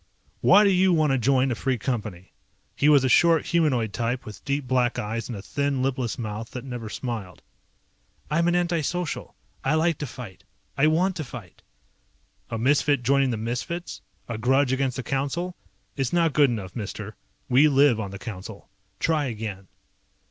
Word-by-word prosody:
"Why 205 - +6
do 200 - +4
you 185 0 +4
want 155 -4 +3
to 135 - +2
join 130 +2 +2
a - - +2
Free 130 +2 -1
Company?" 105 -7 -4 0.4
He 145 - +3
was 145 -3 +6
a - - +3
short, 165 +3 +4
humanoid 130 - +1
type 120 +2 -2
with 105 - -10
deep 140 -1 -1
black 125 -1 +1
eyes 115 0 -3
and 115 - -4
a 95 - -9
thin, 140 +2 -1
lipless 130 -3 -1
mouth 110 -1 -5
that 125 - -5
never 120 -4 -6
smiled. 110 - -6 0.9
"I'm 170 +3 +2
an 175 - +2
anti 175 -2 +1
social. 175 +2 -3 0.3
I 140 +4 +2
like 160 0 +1
to 145 - -3
fight. 115 -6 -10 0.3
I 140 +2 +4
want 175 +4 +2
to 155 - -3
fight." 120 - -11 0.9
"A 115 - -3
misfit 140 +2 +2
joining 140 +1 +3
the 115 - -1
misfits? 125 +10 -4 0.3
A 115 -2 -4
grudge 130 +3 +2
against 130 -1 -1
the 130 - -3
Council? 145 +8 -2 0.4
It's 135 -4 -1
not 170 -3 +2
good 145 -3 +5
enough, 105 -6 -5
mister, 105 -1 -6 0.3
we 135 +4 +5
live 140 -5 +4
on 100 -3 -3
the 100 - -7
Council. 95 -2 -9 0.3
Try 155 -3 +1
again." 105 -5 -5
130 Hz, 180 wpm, -25 LUFS, 115-150 Hz, 0.9 s, Why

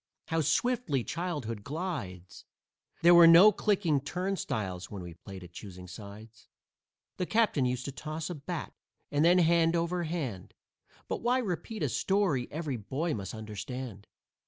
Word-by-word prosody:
How 165 -1 +1
swiftly 165 - +1
childhood 145 - -4
glides! 100 - -5 0.6
There 175 +1 +8
were 170 -1 +9
no 175 +6 +9
clicking 185 -8 +1
turnstiles 135 - -3
when 100 -3 -7
we 85 -1 -8
played 95 +2 -10
at 90 - -12
"choosing 90 -2 -9
sides." 105 +4 -11 0.7
The 180 - -2
captains 210 - +2
used 125 0 -3
to 140 - -3
toss 155 +4 -5
a 180 - -4
bat, 160 +2 -5 0.4
and 145 +1 +2
then, 175 +2 +6
hand 170 -1 +4
over 170 +1 0
hand 135 - -4 0.5
But - - -3
why 245 +2 +2
repeat 215 -1 -3
a - - +1
story 190 -11 +1
every 150 -4 -3
boy 135 +10 -2
must 100 0 -5
understand? 110 0 -7
150 Hz, 150 wpm, -30 LUFS, 110-175 Hz, 0.7 s, were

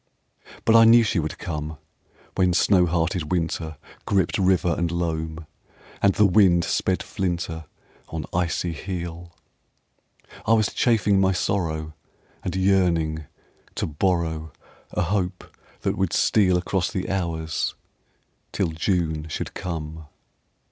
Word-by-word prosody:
But 115 - +5
I 115 - +9
knew 115 +1 +7
she 105 -4 0
would 80 -1 -3
come 75 -2 -5 0.6
When 90 -1 +2
snow 90 -1 +4
hearted 85 -1 -1
winter 80 -3 -2 0.3
Gripped 95 -4 +1
river 90 -3 +3
and 85 -1 -1
loam, 80 -2 -3 0.6
And 100 -1 +4
the 105 - +5
wind 90 -3 +5
sped - - 0
flinter 85 -3 -3 0.4
On 80 -3 -4
icy 85 0 0
heel, 85 0 -6 1.2
I 115 - +5
was 110 -3 +2
chafing 105 -5 +3
my 95 0 +3
sorrow 80 -5 -1 0.5
And 90 - -3
yearning 85 -5 +2 0.5
to - - -1
borrow 80 -1 -1 0.4
A - - -1
hope 90 0 -2 0.3
that - - -1
would - - 0
steal 95 -4 +3
Across 90 0 -1
the 95 -1 -2
hours 85 -5 -2 0.8
till - - 0
June 80 -1 -1
should - - -4
come. 80 -2 -5
85 Hz, 125 wpm, -24 LUFS, 80-95 Hz, 1.2 s, I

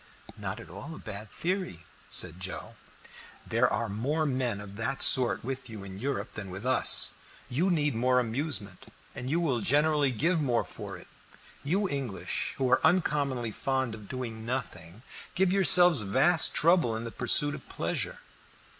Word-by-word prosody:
"Not - - -6
at - - -11
all 135 - -9
a - - -11
bad 105 -1 -9
theory," 180 - -4 0.3
said 85 - -3
Joe. 90 0 -6 0.7
"There - - +1
are 115 -1 -2
more 135 +10 -2
men 125 -6 -1
of 100 -1 -10
that 135 +5 +1
sort 125 -3 +6
with 130 0 -6
you 110 -3 -9
in 95 0 -9
Europe 135 +4 -4
than 100 -4 -8
with 95 +5 -8
us. 130 0 +3 0.4
You 160 +10 0
need 150 -5 0
more 125 +2 +2
amusement, 115 - -3 0.3
and 125 - -6
you 165 +4 0
will 140 -8 0
generally 150 +2 +2
give 160 +8 0
more 125 -5 0
for - - -9
it. - - -15 0.6
You 190 +8 0
English, 135 - -4
who 130 - 0
are 130 - +3
uncommonly 140 -9 0
fond 130 0 -2
of 105 -2 -11
doing 120 -4 -6
nothing, 110 -5 -6 0.3
give 190 0 +1
yourselves 180 - +8
vast 140 - +4
trouble 165 -8 +3
in 110 - -4
the 115 - -6
pursuit 145 +5 +3
of - - -11
pleasure. - - -4
130 Hz, 165 wpm, -28 LUFS, 110-150 Hz, 0.7 s, yourselves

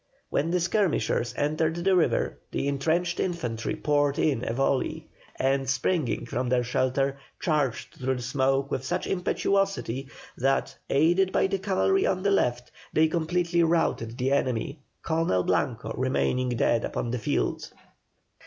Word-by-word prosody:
When 150 +4 +1
the 180 +1 +1
skirmishers 170 - 0
entered 155 +2 0
the 185 +2 +2
river, 175 - +1
the - - -2
entrenched 165 +5 0
infantry 120 -11 -2
poured 145 -1 +1
in 135 -6 +1
a - - -2
volley, 135 +2 0 0.3
and, 135 0 0
springing 140 +2 0
from 125 +1 -2
their 125 0 +2
shelter, 135 +3 0 0.2
charged 145 -8 -1
through 130 +1 0
the 125 - -5
smoke 135 +2 +1
with 130 - -2
such - - -2
impetuosity 190 - 0 0.3
that, 135 +2 +1
aided 175 +6 +3
by - - +2
the 195 0 -1
cavalry 205 - +2
on 185 0 0
the 200 - +2
left, 125 -10 0 0.2
they 160 +1 +4
completely 170 +1 +1
routed 160 -8 +1
the 130 +2 0
enemy, 135 +1 0 0.2
Colonel 160 - +1
Blanco 120 +4 -1
remaining 130 0 0
dead 120 -1 +1
upon 120 - -3
the 125 - -2
field. 110 - -1
140 Hz, 145 wpm, -27 LUFS, 130-170 Hz, 0.3 s, they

